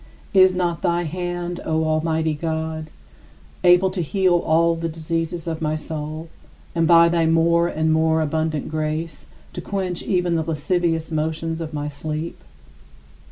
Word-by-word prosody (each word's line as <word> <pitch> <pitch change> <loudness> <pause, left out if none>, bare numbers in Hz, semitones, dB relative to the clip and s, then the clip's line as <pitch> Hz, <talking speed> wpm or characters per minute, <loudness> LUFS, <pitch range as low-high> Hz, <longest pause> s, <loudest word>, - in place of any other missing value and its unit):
42. 195 - +5
Is 185 -1 +4
not 175 -2 -1
thy 175 -1 +1
hand, 175 +1 -4
O 160 0 0
Almighty 160 0 0
God, 160 0 -3 0.7
able 180 +1 +5
to 185 -1 -2
heal 185 +2 +2
all 165 +1 +2
the 165 0 -3
diseases 165 +1 -3
of 165 -1 -4
my 155 -1 0
soul 155 +1 -5 0.5
and, 165 -1 +2
by 170 0 +7
thy 165 -1 +2
more 170 +1 +3
and 160 -1 +1
more 160 0 +3
abundant 155 -1 -1
grace, 155 +1 -3 0.3
to 180 - -5
quench 185 -1 -3
even 180 -2 0
the 165 - +1
lascivious 165 +1 -1
motions 160 +1 -2
of 160 -1 -5
my 145 -1 -3
sleep? 155 +3 -5
165 Hz, 155 wpm, -22 LUFS, 155-175 Hz, 0.7 s, by